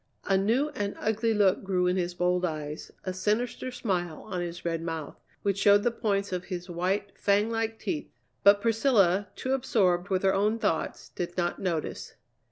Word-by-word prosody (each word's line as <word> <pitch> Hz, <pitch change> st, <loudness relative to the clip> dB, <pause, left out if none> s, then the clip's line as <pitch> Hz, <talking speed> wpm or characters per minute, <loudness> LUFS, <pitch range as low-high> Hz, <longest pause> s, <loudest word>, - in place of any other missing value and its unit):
A 195 Hz, -, +2 dB
new 230 Hz, +10 st, +2 dB
and 205 Hz, -7 st, -3 dB
ugly 220 Hz, +1 st, +1 dB
look 205 Hz, -3 st, +3 dB
grew 185 Hz, -2 st, +1 dB
in 180 Hz, 0 st, +2 dB
his 175 Hz, -1 st, -1 dB
bold 180 Hz, 0 st, +1 dB
eyes, 155 Hz, -3 st, -4 dB
a 185 Hz, -, -3 dB
sinister 215 Hz, +7 st, -1 dB
smile 180 Hz, -9 st, -2 dB
on 185 Hz, -4 st, -3 dB
his 175 Hz, 0 st, -6 dB
red 165 Hz, -1 st, -1 dB
mouth, 165 Hz, -3 st, -4 dB, 0.3 s
which 200 Hz, -1 st, 0 dB
showed 205 Hz, +1 st, +5 dB
the 240 Hz, -, +2 dB
points 200 Hz, -4 st, -1 dB
of 180 Hz, -1 st, -3 dB
his 180 Hz, -1 st, -5 dB
white, 190 Hz, +3 st, -1 dB
fang 205 Hz, +2 st, +2 dB
like 225 Hz, 0 st, -1 dB
teeth. 310 Hz, +3 st, -3 dB, 0.3 s
But 200 Hz, 0 st, +6 dB
Priscilla, 215 Hz, -5 st, +3 dB
too 260 Hz, -, -2 dB
absorbed 200 Hz, -9 st, +1 dB
with 190 Hz, -1 st, 0 dB
her 190 Hz, -, +4 dB
own 210 Hz, +3 st, +2 dB
thoughts, 205 Hz, -8 st, -2 dB
did 175 Hz, 0 st, -5 dB
not 175 Hz, -1 st, 0 dB
notice. 170 Hz, -5 st, -3 dB
195 Hz, 180 wpm, -28 LUFS, 180-215 Hz, 0.3 s, But